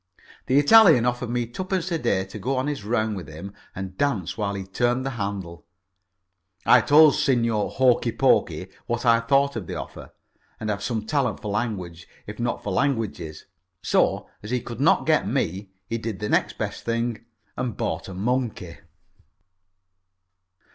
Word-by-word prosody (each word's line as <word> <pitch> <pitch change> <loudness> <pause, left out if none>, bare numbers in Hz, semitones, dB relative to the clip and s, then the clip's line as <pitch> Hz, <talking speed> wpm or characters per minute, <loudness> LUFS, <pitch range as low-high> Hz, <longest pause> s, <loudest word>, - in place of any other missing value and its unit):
The 130 - +3
Italian 150 - +7
offered 125 -1 -1
me 120 0 -1
twopence 185 - -3
a 165 - 0
day 100 -7 0
to 100 +2 -9
go 130 +6 -1
on 130 - 0
his 145 -6 -3
round 110 0 0
with 95 - -7
him 85 +6 -9 0.2
and 95 0 -7
dance 100 -12 0
while 100 -2 -2
he 95 - -4
turned 120 +7 0
the 135 - -2
handle. 100 -7 -5 1.0
I - - +7
told 150 0 +6
Signor 115 -7 +1
Hokey 125 -2 +2
pokey - - +2 0.2
what 120 +1 -2
I 115 -1 +5
thought 140 +3 +2
of 105 -7 -5
the - - -5
offer, - - -8 0.5
and 110 -1 -2
I - - +2
have 100 - -6
some 110 -3 -2
talent 140 +3 0
for 105 - -5
language, 95 -6 -3 0.2
if 105 +1 -9
not 120 0 -2
for 100 - -3
languages. 105 - -2 0.4
So, - - +1
as 105 - -9
he 125 +1 0
could - - -7
not - - +4
get - - +2
me, 95 +4 -2 0.2
he 115 +4 -3
did 110 -3 -4
the 105 +1 -4
next - - +1
best - - -4
thing 115 -1 -2 0.3
and 125 -4 -3
bought 80 +3 -3
a 95 - -8
monkey. 110 -5 -2
115 Hz, 175 wpm, -24 LUFS, 100-130 Hz, 1.0 s, Italian